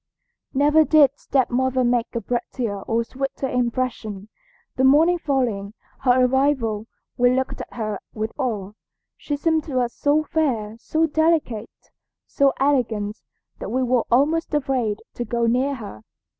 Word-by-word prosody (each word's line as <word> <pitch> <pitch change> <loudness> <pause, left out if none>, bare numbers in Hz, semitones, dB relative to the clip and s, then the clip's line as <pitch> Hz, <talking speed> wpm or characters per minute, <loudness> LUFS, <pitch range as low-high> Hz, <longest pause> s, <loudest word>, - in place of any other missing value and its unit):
"Never 295 +3 +5
did 300 -3 +5
stepmother 260 -1 +1
make 240 -1 0
a 235 - -1
prettier 235 -4 -3
or 230 +2 0
sweeter 270 +2 -4
impression. 235 -5 -2 0.5
The 260 - 0
morning 320 +6 +5
following 230 -9 -1 0.2
her 255 -1 +4
arrival 250 -5 +1 0.3
we 245 +1 +4
looked 260 0 -2
at - - -10
her 215 -4 -3
with 220 0 -4
awe. 210 -7 -2 0.4
She 290 - -4
seemed 320 +1 +1
to 265 -5 -1
us 240 -1 -1
so 295 +2 +2
fair, 250 -10 -1
so 315 +6 +1
delicate, 315 -8 +1 0.6
so 280 -1 +2
elegant, 230 -7 0 0.4
that - - -5
we 255 +4 0
were 250 -1 +1
almost 305 +6 +2
afraid 255 -7 -1
to 240 - -3
go 235 +1 -1
near 255 +4 +1
her. 205 - -9
255 Hz, 145 wpm, -22 LUFS, 230-280 Hz, 0.6 s, Never